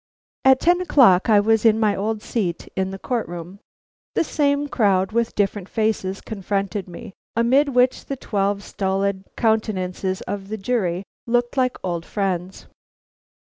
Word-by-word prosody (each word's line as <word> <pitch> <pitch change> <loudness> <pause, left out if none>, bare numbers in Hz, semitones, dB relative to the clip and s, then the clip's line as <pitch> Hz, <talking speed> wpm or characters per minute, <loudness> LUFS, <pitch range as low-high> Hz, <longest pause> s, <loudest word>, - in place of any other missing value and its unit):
At 265 0 +6
ten 350 +1 +3
o'clock 235 - +5
I 210 -2 +6
was 220 +1 +2
in 225 -1 +4
my 210 -2 +2
old 215 +2 -2
seat 185 -8 -2
in 190 0 -1
the 195 - -6
court 235 +3 -2
room. 175 +3 -8 0.6
The - - +3
same 290 -2 +1
crowd 195 -7 +2
with 235 +1 0
different 200 -1 -1
faces 210 -3 -1
confronted 200 -1 -3
me, 175 +2 -10 0.2
amid 260 +6 +3
which 250 -1 +2
the 275 - -4
twelve 200 -3 -1
stolid 195 0 -2
countenances 190 -4 0
of 195 0 -5
the 215 +2 -4
jury 195 -4 -1 0.2
looked 240 +1 +1
like 255 -2 +1
old 175 -3 -2
friends. 190 -1 -3
205 Hz, 150 wpm, -22 LUFS, 190-235 Hz, 0.6 s, At